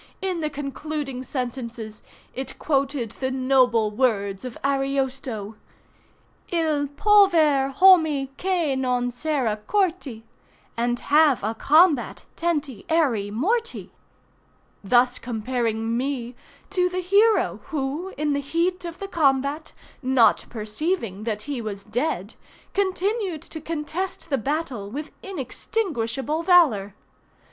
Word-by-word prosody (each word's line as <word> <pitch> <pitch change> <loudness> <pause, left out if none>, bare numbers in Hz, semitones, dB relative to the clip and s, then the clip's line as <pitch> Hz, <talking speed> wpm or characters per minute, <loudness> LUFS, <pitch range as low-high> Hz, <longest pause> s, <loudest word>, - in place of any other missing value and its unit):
In 375 -3 -2
the 305 -1 -1
concluding 290 -1 -5
sentences 240 -4 -5 0.3
it 265 0 -6
quoted 275 -5 0
the 260 +3 -3
noble 255 -4 +2
words 205 -4 0
of 250 -2 -7
Ariosto— 270 -6 -1 0.9
Il 310 -4 +1
pover 310 -5 +4
hommy 315 -5 +5
che 350 -6 0
non 250 -2 0
sera 245 -5 -1
corty 340 - 0 0.5
And 240 +1 0
have 295 -6 +4
a 220 +2 0
combat 300 +3 +3
tenty 295 - -2
erry 265 -11 +2
morty; 445 - -1 0.9
thus 245 +4 +3
comparing 230 -1 -2
me 250 -1 -2 0.4
to 360 -2 +2
the 365 +1 -2
hero 410 +5 +3
who, 305 +5 -3
in 295 0 0
the 285 - 0
heat 345 +5 -1
of 340 0 -6
the 395 - -6
combat, 285 -2 +1 0.3
not 260 -3 +3
perceiving 220 - -3
that 215 -2 -2
he 280 -4 -4
was 200 -3 -6
dead, 230 - -2 0.4
continued 390 -2 -1
to 315 - -7
contest 330 +2 -4
the 275 - +2
battle 270 -6 -3
with 295 +7 -6
inextinguishable 300 - -2
valor. 285 - +4
275 Hz, 115 wpm, -24 LUFS, 240-330 Hz, 0.9 s, hommy